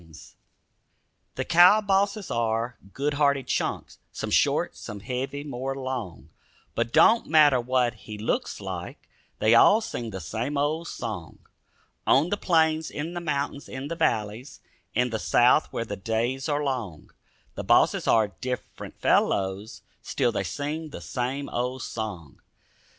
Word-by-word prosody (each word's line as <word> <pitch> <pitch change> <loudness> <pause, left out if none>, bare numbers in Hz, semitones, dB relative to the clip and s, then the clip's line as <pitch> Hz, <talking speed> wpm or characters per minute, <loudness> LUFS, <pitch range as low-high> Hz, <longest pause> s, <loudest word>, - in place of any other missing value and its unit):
DOGIE 80 -1 -19
SONG - - -15 1.0
The - - -3
cow 180 +5 +7
bosses 200 0 0
are 115 +1 -1 0.2
good 145 +5 -1
hearted 140 -2 +2
chunks, - - -3
Some - - -5
short, - - +2
some 105 -1 -8
heavy, 135 +5 -4
more 135 -1 -4
long; 120 - -5 0.4
But 115 0 -1
don't 230 - +5
matter 150 -5 +5
what 125 -1 +1
he 105 -1 -10
looks 105 - -2
like, - - -7 0.3
They 110 +1 +3
all 200 - +7
sing 120 - -5
the 95 -3 -6
same 115 - -3
old 155 +4 0
song. - - -6 0.7
On 145 +6 +4
the 205 - +1
plains, 160 -4 +2
in 160 +4 -5
the 175 - -4
mountains, 145 -3 -3
in 130 +2 -6
the 170 - -3
valleys, 115 -4 -1 0.4
In 125 +1 +1
the 110 - -2
south 120 +8 +3
where 115 - -3
the 100 -2 -5
days 115 +7 -2
are 145 0 0
long, 120 - -4 0.4
The - - -5
bosses - - +3
are 110 -2 +4
different 125 +5 -6
fellows; 95 +3 0 0.2
Still 125 -3 0
they 100 -3 -2
sing 150 - -4
the - - -8
same 135 +3 -3
old 125 +1 -3
song. 95 -10 -6
130 Hz, 150 wpm, -26 LUFS, 110-150 Hz, 1.0 s, cow